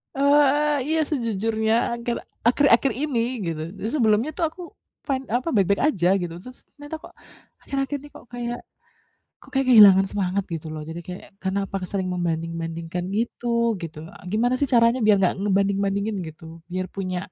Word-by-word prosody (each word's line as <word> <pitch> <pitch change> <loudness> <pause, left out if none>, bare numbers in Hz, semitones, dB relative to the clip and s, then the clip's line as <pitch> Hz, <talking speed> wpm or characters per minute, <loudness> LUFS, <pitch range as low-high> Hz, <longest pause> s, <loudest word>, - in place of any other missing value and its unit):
Eee 280 +2 +5
eee, 295 0 +1
iya 320 +1 +1
sejujurnya 225 -4 0 0.3
akhir 235 0 -2 0.3
akhir-akhir 265 0 +4
ini 275 -3 -1 0.3
gitu. 160 -2 -3 0.2
Jadi, 220 - -3
sebelumnya 230 +3 +2
tuh 335 - +1
aku 360 - -12 0.5
fine, 270 -2 -1
apa, 245 +7 -1
baik-baik 200 -1 +2
aja, 175 - 0
gitu. 175 -2 -4
Terus 255 0 -11 0.2
ternyata 290 +2 -8
kok - - -11 0.5
akhir-akhir 275 +1 -2
ini 290 +2 -13
kok - - -12
kayak 240 0 -3 0.8
kok - - -18
kayak 270 0 +1
kehilangan 195 -4 +8
semangat, 195 -1 -1
gitu 160 0 -6
loh. 155 - -5
Jadi 165 +1 -6
kayak, 180 0 -7 0.2
karena 190 +1 -1
apa 195 - -4
ke - - -3
sering 190 -2 -2
membanding-bandingkan 165 0 -3
gitu 235 0 0
gitu, 160 -2 -7
e - - -15
gimana 240 +4 +2
sih 285 - +1
caranya 235 +1 +5
biar 210 -1 +6
enggak 185 - +2
ngebanding-bandingin 200 +1 +1
gitu? 160 +1 -13 0.3
Biar 185 0 -2
punya 185 -2 -2
215 Hz, 170 wpm, -24 LUFS, 185-255 Hz, 0.8 s, kehilangan